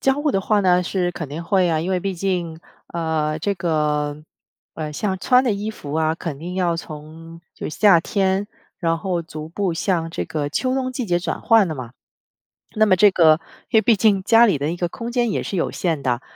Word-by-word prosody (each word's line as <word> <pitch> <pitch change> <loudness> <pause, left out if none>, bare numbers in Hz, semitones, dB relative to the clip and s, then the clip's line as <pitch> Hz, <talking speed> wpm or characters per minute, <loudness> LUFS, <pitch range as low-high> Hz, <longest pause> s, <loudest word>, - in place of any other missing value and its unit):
交 270 - +3
互 290 +1 0
的 195 - +1
话 210 0 +2
呢， 180 -2 +3
是 180 0 -1
肯 165 -3 -6
定 155 +4 -6
会 185 +1 +2
啊， 160 -2 +1
因 175 +4 -3
为 185 - +1
毕 195 0 -2
竟， 175 -3 -2 0.3
呃， 160 -2 -1
这 200 +5 -1
个， 150 -3 -1 0.5
呃， 155 -1 -5
像 190 +3 -2
穿 250 +7 +4
的 250 - +1
衣 205 +2 -3
服 145 -8 -8
啊， 160 0 +1
肯 165 -4 -6
定 175 +4 -6
要 175 -3 0
从 165 +1 -10
就 - - -5
是 155 - -7
夏 200 -6 +6
天， 190 +2 0 0.3
然 165 -1 0
后 180 -2 -2
逐 155 -1 -8
步 185 +1 -2
向 165 -1 -1
这 - - -3
个 145 -2 -3
秋 255 - 0
冬 255 -1 -2
季 250 -3 -3
节 175 -1 +1
转 175 - -4
换 225 -3 +4
的 160 - -4
嘛。 125 -3 -8 0.8
那 215 0 +4
么 185 - +5
这 205 +2 +6
个 160 -4 +5 0.3
因 - - +3
为 220 - +6
毕 225 +1 +4
竟 200 -2 +2
家 230 +2 +6
里 190 -8 +2
的 145 +3 -2
一 - - -3
个 175 0 -1
空 235 +6 -6
间 240 -2 +1
也 - - -1
是 - - -4
有 170 - 0
限 165 -6 -1
的， 125 -1 0
175 Hz, 245 characters per minute, -21 LUFS, 160-200 Hz, 0.8 s, 夏